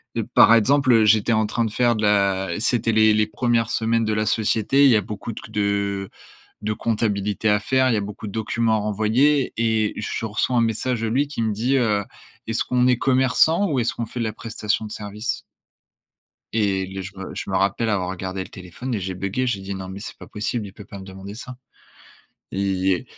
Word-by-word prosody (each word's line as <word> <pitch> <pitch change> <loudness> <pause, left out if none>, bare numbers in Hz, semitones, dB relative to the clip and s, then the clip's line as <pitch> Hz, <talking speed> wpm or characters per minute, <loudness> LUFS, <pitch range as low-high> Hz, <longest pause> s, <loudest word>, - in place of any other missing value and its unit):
heu, - - 0
par - - +8
exemple, 125 0 +4
j'étais 110 +1 +4
en 110 0 +2
train 115 +2 0
de 110 - -3
faire 120 0 +2
de 110 - -3
la 100 -2 +2
c'était 115 -1 +1
les 110 0 +5
les 105 0 +3
premières 120 -2 0
semaines 115 0 +1
de 110 - 0
la 105 0 0
société, 110 +5 +2
il 140 - +7
y 115 - +5
a 105 - +3
beaucoup 105 +2 -6
q 105 - -10
de 100 -2 -1 0.5
de 105 +1 -1
comptabilité 105 -2 0
à 105 0 +3
faire, 130 +4 +2
il 115 - +2
y - - +2
a - - 0
beaucoup 105 +1 -7
de 100 - -6
documents 110 0 0
à - - 0
renvoyer 110 +7 +2
et 110 -2 +1
je 105 +1 -3
reçois 110 +3 0
un 120 - +4
message 115 +1 -1
de 115 - 0
lui 140 +5 +1
qui 145 -5 -3
me 110 -1 0
dit: 120 +6 +1
«Heu, 105 -5 +1 0.4
est-ce 115 0 -1
qu'on 125 0 +2
est 125 -1 +4
commerçant 130 +8 +3
ou 135 - +1
est-ce 120 - 0
qu'on 115 - -4
fait 120 +2 -6
de - - 0
la 110 - -2
prestation 110 0 -3
de 105 - -8
service? 105 +2 -4 1.1
Et 100 -4 +1
le 95 +1 -6
je 95 +2 -8
me 95 - -7
je - - -6
me 95 - +1
rappelle 100 +4 +1
avoir 95 -3 0
regardé 95 0 -4
le - - -13
téléphone 95 +8 -7
et 105 - -1
j'ai 95 0 -4
buggé, 100 +8 -2
j'ai 100 -5 -1
dit: 100 +1 -5
«Non 95 -1 -7
mais 95 +1 -7
c'est - - -8
pas - - -12
possible, 105 +1 -3
il 95 - -11
peut 105 -2 -12
pas 100 -2 -10
me - - -9
demander 95 +1 -9
ça» 125 +1 -9 0.9
et 95 -1 0
110 Hz, 230 wpm, -22 LUFS, 100-115 Hz, 1.1 s, par